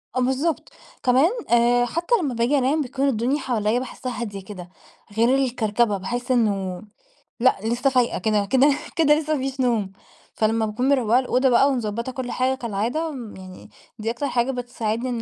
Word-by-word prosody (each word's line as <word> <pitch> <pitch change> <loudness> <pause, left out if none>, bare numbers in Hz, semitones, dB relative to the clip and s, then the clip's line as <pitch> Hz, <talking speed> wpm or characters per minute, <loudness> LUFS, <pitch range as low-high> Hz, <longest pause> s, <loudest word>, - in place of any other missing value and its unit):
آه - - +1
بالضبط. 265 - -1 0.3
كمان 260 +7 +4 0.2
آآ، 240 +1 +4
حتى 340 - 0
لما 280 -6 -2
باجي 240 +5 +1
أنام 275 +4 +1
بتكون 270 +1 -1
الدنيا 255 +4 0
حواليَّا 235 -3 0
باحسّها 255 -1 -6
هادية 200 -4 -5
كده، 185 -3 -9 0.5
غير 235 +4 +4
الكركبة، 235 -5 +1
باحس 245 +7 -4
إنّه 195 -7 0 0.6
لأ، 255 +2 +4
لسه 240 +4 +1
فايقة 250 -2 +1
كده 210 +1 +1
كده 260 +7 +4 0.3
كده 315 -3 +4
لسه 310 0 -2
ما - - -2
فيش 265 0 -4
نوم. 230 -6 +1 0.4
فلما 220 +1 +1
باكون 235 +5 -1
مروَّقة 250 -4 +3
الأوضة 260 +1 +1
بقى 255 +3 +4
ومضبَّطة 235 -1 -2
كل 255 -1 -5
حاجة 260 +1 0
كالعادة 240 +6 -2 0.3
يعني، 185 -1 -12 0.3
دي 220 +1 -1
أكتر 245 +5 -3
حاجة 245 0 0
بتساعدني 245 -1 -3
إن 240 -2 -3
245 Hz, 170 wpm, -23 LUFS, 220-265 Hz, 0.6 s, كمان